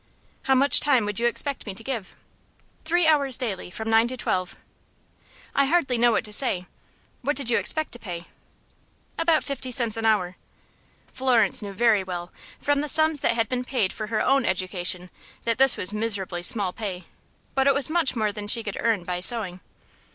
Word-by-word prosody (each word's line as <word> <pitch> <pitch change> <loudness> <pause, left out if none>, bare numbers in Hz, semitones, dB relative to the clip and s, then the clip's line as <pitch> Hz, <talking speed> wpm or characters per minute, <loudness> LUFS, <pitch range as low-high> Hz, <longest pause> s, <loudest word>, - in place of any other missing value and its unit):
"How 265 - +3
much 275 +2 +5
time 260 -7 +2
would 210 +1 -4
you 240 - +2
expect 275 +1 -2
me 195 - -6
to 225 - -9
give?" 230 -6 -5 0.7
"Three 345 +2 +2
hours 280 -5 +3
daily 205 -8 -4
from 220 +5 -7
nine 225 +1 +4
to 255 +1 -6
twelve." 185 -5 -3 1.0
"I 280 - +2
hardly 280 -4 +1
know 240 0 +4
what - - 0
to 210 - -4
say. 200 -7 +4 0.6
What 290 +4 -1
did 265 -4 -2
you - - +3
expect 315 -1 0
to 240 - -8
pay?" 175 -5 -7 0.9
"About 330 -1 +2
fifty 265 -2 -4
cents 235 -3 +2
an 225 0 -1
hour." 185 -5 0 0.8
Florence 245 -6 +2
knew 205 -1 -6
very 215 -1 +2
well, 175 -1 -6 0.3
from 285 0 0
the 300 - -4
sums 315 +1 +2
that - - +2
had 230 -1 0
been 250 +1 -3
paid 245 -7 -1
for 215 0 -6
her 215 -1 -1
own 275 -1 +2
education, 185 -2 -3 0.3
that 230 +1 -1
this 270 -1 +5
was 185 +3 +2
miserably 200 -5 -2
small 195 -1 +1
pay; 190 -5 -6 0.5
but 270 0 +1
it 275 - +4
was 280 -2 +4
much 320 -5 +1
more 215 -2 0
than 205 0 -8
she 230 +2 +1
could 205 -3 -6
earn 225 -6 0
by 180 0 -4
sewing. 185 -2 +4
230 Hz, 195 wpm, -24 LUFS, 200-270 Hz, 1.0 s, much